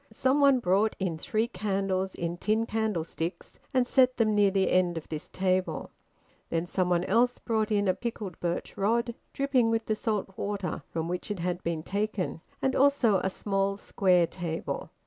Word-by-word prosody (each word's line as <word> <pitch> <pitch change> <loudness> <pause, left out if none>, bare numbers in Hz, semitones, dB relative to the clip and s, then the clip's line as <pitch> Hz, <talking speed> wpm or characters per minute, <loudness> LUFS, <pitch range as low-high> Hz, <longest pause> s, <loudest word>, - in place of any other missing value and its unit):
Some 260 +6 +2
one 275 -2 +6
brought 205 +1 +2
in 175 -4 -2
three 220 +6 0
candles 190 -2 -1
in 170 0 -3
tin 220 +4 +1
candlesticks 195 -6 -3
and 255 -3 +3
set 255 0 +3
them 220 -3 +3
near 205 -1 +5
the 195 0 +1
end 180 -2 +2
of 160 - -6
this 155 -2 -5
table. 185 0 -1 0.6
Then 165 +1 0
somebody 180 -1 0
else 240 +4 +3
brought 220 -2 -1
in 205 -2 +1
a 185 - +4
pickled 215 -6 -5
birch 175 0 -3
rod, 235 +4 +1 0.2
dripping 275 -4 +2
with 225 0 0
the 220 - 0
salt 210 -3 -2
water 200 -4 -3
from 165 0 -3
which 180 +5 -4
it 205 - -2
had 175 +1 -2
been 165 -2 -2
taken, 200 -3 -2 0.2
and 265 0 +2
also 270 -7 +4
a 190 - 0
small 195 0 -1
square 180 -4 +3
table. 165 -1 -4
200 Hz, 175 wpm, -28 LUFS, 180-225 Hz, 0.6 s, one